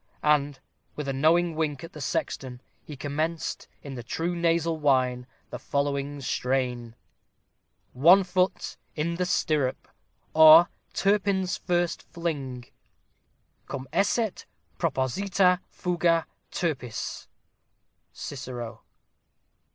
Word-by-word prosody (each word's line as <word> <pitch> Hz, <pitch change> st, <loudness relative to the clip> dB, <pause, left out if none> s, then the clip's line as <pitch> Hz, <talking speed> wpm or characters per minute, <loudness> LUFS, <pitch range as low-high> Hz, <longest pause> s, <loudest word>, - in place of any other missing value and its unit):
And, 145 Hz, -2 st, +2 dB, 0.4 s
with 150 Hz, -2 st, -5 dB
a 135 Hz, -, -1 dB
knowing 165 Hz, +4 st, +3 dB
wink 155 Hz, -3 st, -2 dB
at 165 Hz, -, -9 dB
the 150 Hz, -, -9 dB
sexton, 130 Hz, -2 st, -3 dB, 0.2 s
he 150 Hz, -, -9 dB
commenced, 155 Hz, +4 st, -3 dB, 0.2 s
in 140 Hz, -, -7 dB
the 125 Hz, -, -6 dB
true 165 Hz, +9 st, -2 dB
nasal 165 Hz, -1 st, +1 dB
whine, 130 Hz, -4 st, +2 dB, 0.2 s
the 125 Hz, -, -5 dB
following 140 Hz, +1 st, -2 dB
strain: 125 Hz, -3 st, -1 dB, 1.0 s
ONE 170 Hz, +9 st, +6 dB
FOOT 180 Hz, 0 st, -1 dB, 0.2 s
IN 170 Hz, +2 st, -1 dB
THE 180 Hz, 0 st, 0 dB
STIRRUP 150 Hz, -7 st, 0 dB, 0.5 s
OR 160 Hz, +2 st, +9 dB, 0.3 s
TURPIN'S 195 Hz, -2 st, +1 dB
FIRST 175 Hz, -1 st, 0 dB
FLING 140 Hz, -8 st, -4 dB, 1.0 s
Cum 135 Hz, -1 st, -6 dB
esset 205 Hz, +3 st, 0 dB, 0.3 s
proposita 180 Hz, +6 st, +2 dB
fuga 170 Hz, -2 st, +1 dB, 0.3 s
_Turpi_(n)_s_. 135 Hz, -9 st, -3 dB, 0.8 s
CICERO. 120 Hz, -5 st, -7 dB
155 Hz, 100 wpm, -27 LUFS, 135-175 Hz, 1.0 s, OR